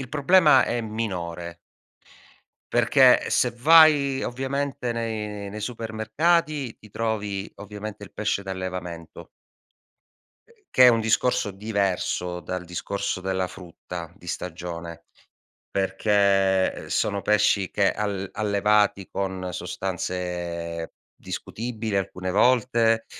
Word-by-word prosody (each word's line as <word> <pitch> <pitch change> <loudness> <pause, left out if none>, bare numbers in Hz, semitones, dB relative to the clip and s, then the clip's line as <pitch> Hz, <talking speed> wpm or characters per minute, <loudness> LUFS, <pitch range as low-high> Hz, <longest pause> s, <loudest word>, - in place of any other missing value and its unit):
il 125 - -6
problema 150 -1 +5
è 120 - -1
minore. 90 -7 -4 1.1
Perché - - +5
se 125 - +2
vai, 140 +1 +5
ovviamente, 135 0 -2
nei 105 -3 -4
nei 105 +2 -7
supermercati 125 +6 0
ti 105 - -16
trovi, 105 -2 -3
ovviamente, 105 +1 -8
il 100 - -11
pesce 105 -2 -1
d'allevamento. 90 -3 -6 1.5
Che 130 - +7
è 125 - +10
un 115 -1 +3
discorso 115 +1 +1
diverso 95 -3 -2
dal 90 0 -5
discorso 95 +2 -3
della 95 -1 -1
frutta 85 -2 -9
di 90 - -16
stagione, 85 -1 -6 0.7
perché, 95 -1 +2
ehm, - - -9
sono 100 -1 0
pesci 100 -1 +2
che 100 -1 +2
al 100 -2 -3
allevati 105 -2 +2
con 95 -2 -3
sostanze 90 -2 -4 0.2
discutibile 110 -3 -4
alcune 95 -1 -3
volte, 115 0 +3
100 Hz, 105 wpm, -25 LUFS, 95-115 Hz, 1.5 s, è